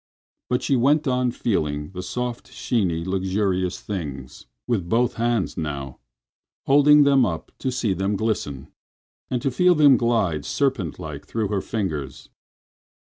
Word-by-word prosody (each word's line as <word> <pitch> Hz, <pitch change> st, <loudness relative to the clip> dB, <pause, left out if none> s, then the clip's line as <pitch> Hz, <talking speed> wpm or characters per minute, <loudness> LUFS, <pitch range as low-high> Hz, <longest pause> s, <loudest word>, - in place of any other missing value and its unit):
But 125 Hz, -, 0 dB
she 140 Hz, -, +2 dB
went 145 Hz, +5 st, +3 dB
on 125 Hz, -1 st, +1 dB
feeling 75 Hz, -11 st, -2 dB
the 90 Hz, -1 st, -6 dB
soft, 125 Hz, +5 st, -4 dB
sheeny 90 Hz, -8 st, -1 dB
luxurious 95 Hz, -1 st, -1 dB
things—with 85 Hz, -, -5 dB
both 120 Hz, +1 st, +2 dB
hands 115 Hz, -4 st, -1 dB
now, 70 Hz, -4 st, -5 dB, 0.7 s
holding 145 Hz, +1 st, +6 dB
them 140 Hz, -2 st, +4 dB
up 85 Hz, -8 st, -3 dB
to 130 Hz, -, -1 dB
see 120 Hz, -5 st, 0 dB
them 95 Hz, +3 st, -1 dB
glisten, 95 Hz, -11 st, -2 dB, 0.6 s
and 125 Hz, -2 st, -2 dB
to 135 Hz, -, +1 dB
feel 180 Hz, +7 st, +4 dB
them 145 Hz, -4 st, +6 dB
glide 105 Hz, -11 st, +1 dB
serpent 130 Hz, -, -1 dB
like -, -, -8 dB
through 110 Hz, -3 st, -2 dB
her 100 Hz, -2 st, -1 dB
fingers. 75 Hz, -12 st, -4 dB
105 Hz, 135 wpm, -23 LUFS, 85-125 Hz, 0.7 s, holding